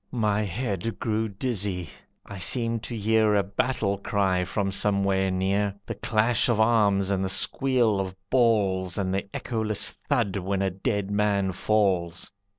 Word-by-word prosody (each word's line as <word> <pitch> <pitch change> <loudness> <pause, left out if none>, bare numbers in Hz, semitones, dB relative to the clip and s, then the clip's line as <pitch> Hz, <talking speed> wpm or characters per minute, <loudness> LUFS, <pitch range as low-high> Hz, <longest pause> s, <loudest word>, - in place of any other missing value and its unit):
My 105 -4 0
head 105 +1 -3
grew 110 -1 -1
dizzy, 100 -5 -3 0.4
I 100 -1 -9
seemed 115 +5 +2
to 120 - -5
hear 110 0 +2
A 100 - +3
battle 100 0 -1
cry 95 -3 0
from 95 +2 -2
somewhere 100 -1 +1
near, 95 +2 0
The - - -4
clash 110 +2 +1
of 115 -2 +1
arms, 105 -4 +3
and 95 -1 0
the 95 - -1
squeal 120 -1 +2
of 95 -1 -4 0.2
balls, 100 -7 +2
And 95 -2 -1
the 100 +1 -2
echoless 110 -3 -1
thud 115 -9 -1
when 95 +1 -1
a 95 - 0
dead 100 +1 -2
man 100 -2 +1
falls. 95 -3 0
100 Hz, 155 wpm, -26 LUFS, 95-110 Hz, 0.4 s, A